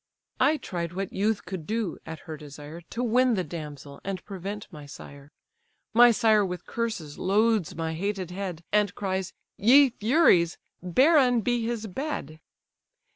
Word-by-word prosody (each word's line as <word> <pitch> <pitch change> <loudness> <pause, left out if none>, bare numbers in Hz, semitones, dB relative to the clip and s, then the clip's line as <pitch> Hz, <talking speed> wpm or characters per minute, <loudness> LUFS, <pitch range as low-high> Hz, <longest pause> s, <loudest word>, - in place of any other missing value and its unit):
I 310 +2 +4
tried 170 - -5
what 195 +1 -4
youth 210 +2 0
could 180 -5 -6
do 220 -5 -2
(at 160 -1 -7
her 160 -2 -7
desire) 150 +2 -10
To 240 - -3
win 250 +1 +3
the 185 - 0
damsel, 150 -4 -8
and 195 -1 -5
prevent 200 +1 -6
my 150 -4 -10
sire. 140 0 -12 0.6
My 240 +2 +8
sire 220 -2 +4
with 180 -2 -5
curses 220 -11 -4
loads 210 -1 +2
my 160 -1 -3
hated 190 +1 -3
head, 180 -3 -5
And 210 -2 +2
cries, 190 -2 -2 0.3
'Ye 260 +5 +6
furies! 215 - +3 0.2
barren 255 - +4
be 240 +1 0
his 230 -1 -3
bed. 205 - -5
195 Hz, 150 wpm, -27 LUFS, 170-230 Hz, 0.6 s, My